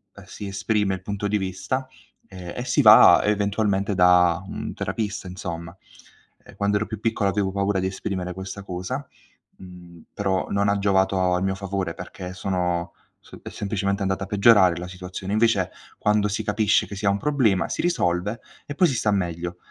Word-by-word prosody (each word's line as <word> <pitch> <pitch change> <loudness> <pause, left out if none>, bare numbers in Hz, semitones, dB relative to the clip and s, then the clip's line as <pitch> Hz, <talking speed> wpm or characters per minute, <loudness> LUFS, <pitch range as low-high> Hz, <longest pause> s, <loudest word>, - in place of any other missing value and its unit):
ehm, - - -12
si 105 - -8
esprime 100 0 0
il 95 - -10
punto 100 +1 -3
di 105 +1 +1
vista, 100 +7 -3 0.4
ehm, 90 -2 -8
e - - -4
si - - +2
va - - +8
eventualmente 100 -1 0
da 90 -2 +4
un - - -5
terapista 105 -3 -4
insomma. 85 -2 -6 0.7
Ehm, - - -15
quando 100 0 +1
ero 105 - -1
più 110 0 -7
piccolo 110 -3 0
avevo 95 0 -1
paura 100 0 0
di 95 - -1
esprimere 95 -1 -4
questa 95 +2 -7
cosa, 95 +9 -5 0.5
mhmm, 90 -2 -13
però 95 -3 -1
non 100 0 +1
ha 100 - +2
giovato 95 -2 +2
a 90 - 0
mio 95 0 0
favore 95 -3 -3
perché 90 +1 -8
sono 90 -2 -2 0.3
s - - -14
è - - -7
semplicemente 100 -1 -2
andata 95 0 -1
a - - -6
peggiorare 100 -3 +5
la 90 +1 -6
situazione. 90 +1 -6
Invece 110 -4 +2 0.3
quando 105 0 +1
si 105 - -2
capisce 105 -2 +2
che 100 - -8
si 100 +2 -5
ha - - +5
un 100 - +1
problema 120 -8 +1
si - - -3
risolve 105 - 0 0.3
e 145 - -6
poi 180 +5 +3
si 135 - -1
sta 110 -2 +1
meglio. 90 -2 -2
95 Hz, 185 wpm, -24 LUFS, 90-105 Hz, 0.7 s, va